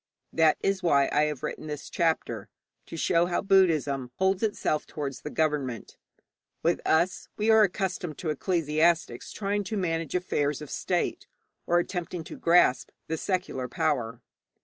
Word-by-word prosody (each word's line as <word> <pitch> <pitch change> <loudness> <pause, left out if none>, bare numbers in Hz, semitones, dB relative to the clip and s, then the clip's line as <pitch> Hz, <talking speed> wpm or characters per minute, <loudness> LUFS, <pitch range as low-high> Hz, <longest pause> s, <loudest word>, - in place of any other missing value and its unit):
That 160 -1 +4
is 195 -1 0
why 140 -6 +3
I 150 +1 +3
have 150 -4 -4
written 155 - -5
this 150 -1 -6
chapter, 165 -2 -1 0.4
to 165 - -7
show 170 +1 +2
how 175 - 0
Buddhism 155 - +3
holds 190 0 +1
itself 205 -8 -1
towards 140 -4 -5
the - - -5
government. 145 -7 -2 0.7
With 170 +1 +2
us, 170 +4 +2
we 215 +1 +3
are 220 0 +7
accustomed 185 -5 -1
to 160 -4 -2
ecclesiastics 165 +1 0
trying 205 0 -1
to 215 +3 -3
manage 165 -4 -2
affairs 150 -5 0
of 150 -2 -9
state, - - -2 0.4
or 175 - +3
attempting 175 -1 -2
to - - -9
grasp 170 -6 +3 0.2
the 160 - 0
secular 180 -8 -2
power. 125 -3 -1
165 Hz, 150 wpm, -27 LUFS, 150-185 Hz, 0.7 s, are